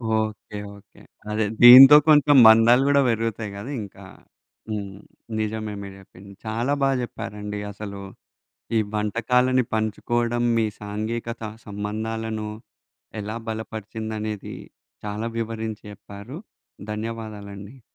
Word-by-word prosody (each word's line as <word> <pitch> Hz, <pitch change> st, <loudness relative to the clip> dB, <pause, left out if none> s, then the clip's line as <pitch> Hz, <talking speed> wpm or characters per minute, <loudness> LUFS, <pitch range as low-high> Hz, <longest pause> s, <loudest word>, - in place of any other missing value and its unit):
Okay. 110 Hz, -1 st, -3 dB, 0.2 s
Okay. 100 Hz, -, -20 dB, 0.3 s
అదే 110 Hz, 0 st, 0 dB, 0.2 s
దీంతో 130 Hz, +4 st, +11 dB
కొంత 150 Hz, -3 st, +5 dB, 0.2 s
మందాలు 115 Hz, +3 st, +6 dB
గూడా 140 Hz, 0 st, +4 dB
పెరుగుతాయి 115 Hz, -2 st, -2 dB
గదా 105 Hz, +8 st, -7 dB
ఇంకా. 100 Hz, -, -13 dB, 0.7 s
హ్మ్. 100 Hz, -2 st, -5 dB, 0.4 s
నిజమే 110 Hz, 0 st, -3 dB
మీరు 100 Hz, -1 st, -9 dB
చెప్పింది. 100 Hz, +1 st, -15 dB
చాలా 115 Hz, +6 st, -1 dB
బాగా 135 Hz, -1 st, +2 dB
జెప్పారండి 105 Hz, -3 st, -6 dB
అసలు. 100 Hz, -1 st, -8 dB, 0.8 s
ఈ -, -, +4 dB, 0.2 s
వంటకాలని 125 Hz, +4 st, +1 dB
పంచుకోడం. 120 Hz, +2 st, -1 dB
మీ 115 Hz, -1 st, +2 dB
సాంఘీ‌కత 115 Hz, +3 st, -5 dB, 0.2 s
సంబంధాలను 110 Hz, +1 st, -4 dB, 0.7 s
ఎలా 105 Hz, +2 st, -5 dB
బలపరిచిందనేది 110 Hz, -1 st, -6 dB, 0.5 s
చాలా 105 Hz, +2 st, -3 dB
వివరించి 110 Hz, -1 st, -4 dB
చెప్పారు. 100 Hz, -, -11 dB, 0.5 s
ధన్యవాదాలండి. 105 Hz, 0 st, -7 dB
110 Hz, 100 wpm, -23 LUFS, 105-115 Hz, 0.8 s, దీంతో